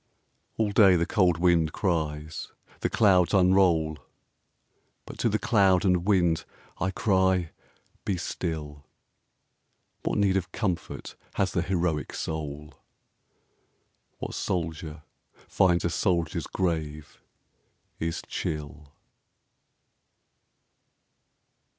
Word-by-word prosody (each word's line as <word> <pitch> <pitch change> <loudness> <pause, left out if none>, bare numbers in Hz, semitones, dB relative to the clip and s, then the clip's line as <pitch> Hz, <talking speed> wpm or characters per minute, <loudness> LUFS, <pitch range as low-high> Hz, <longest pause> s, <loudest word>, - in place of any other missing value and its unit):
All 110 -2 +1
day 100 -3 +6
the 85 -1 +2
cold 90 -5 +2
wind 85 -2 +2
cries, 80 -4 -2 0.3
the - - -1
clouds 95 -4 +4
unroll; 90 -5 +3 1.1
But - - -11
to - - +2
the - - +1
cloud 95 -4 +3
and 90 -1 +2
wind 85 -5 +3 0.4
I 95 - 0
cry, 95 -3 +1 0.5
"Be 95 - -1
still!" 75 -5 -5 1.1
What - - -1
need 100 -2 +3
of 90 -2 -4
comfort 95 -6 -3 0.2
has 95 -1 +1
the 85 - 0
heroic 85 -4 -1
soul? 75 -1 -5 1.4
What - - -6
soldier 80 -3 -3 0.4
finds 85 -2 +2
a - - +2
soldier's 85 -3 0
grave 80 -5 -3 0.8
is 80 0 -3
chill? 75 -1 -5
85 Hz, 95 wpm, -27 LUFS, 80-95 Hz, 1.4 s, day